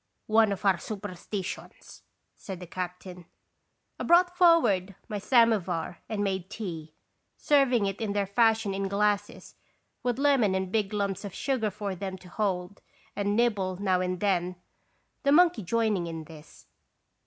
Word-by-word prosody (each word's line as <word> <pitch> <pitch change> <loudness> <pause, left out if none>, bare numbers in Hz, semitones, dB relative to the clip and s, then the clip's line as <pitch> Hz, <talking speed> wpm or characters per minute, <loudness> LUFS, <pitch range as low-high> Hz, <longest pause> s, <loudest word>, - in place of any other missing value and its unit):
" - - -50
One 220 -2 +5
of 200 +1 -4
our 190 -3 +4
superstitions," 195 -1 -7 0.3
said 190 -3 -8
the 180 - -8
cap 180 +1 -5
tain. 180 -2 -11 0.7
I - - -3
brought 355 +1 +4
forward 230 - +4
my 210 -3 -4
samovar 200 -8 +2
a.n& 210 -2 -1
made 190 -2 -2
tea, 165 -8 -7 0.4
serving 265 -7 +3
it 195 +2 -3
in 210 -2 -1
their 205 -1 0
fashion 220 0 +2
in 195 0 -2
glasses, 205 +1 -1 0.5
with 245 -1 -1
lemon 270 -9 +3
and 190 -1 -2
big 210 -2 0
lumps 200 -2 -2
of 200 -2 -7
sugar 255 -6 0
for 205 -1 -4
them 190 +1 -5
to 180 0 -15
hold 185 -1 -2 0.3
and 205 0 0
nibble 205 -6 +1
now 185 -2 +1
and 180 0 -2
then, 180 -3 0 0.7
the 280 - +2
monkey 345 -2 +5
joining 210 -2 0
in 165 -1 -6
this. 155 -1 -15
200 Hz, 155 wpm, -28 LUFS, 185-220 Hz, 0.7 s, One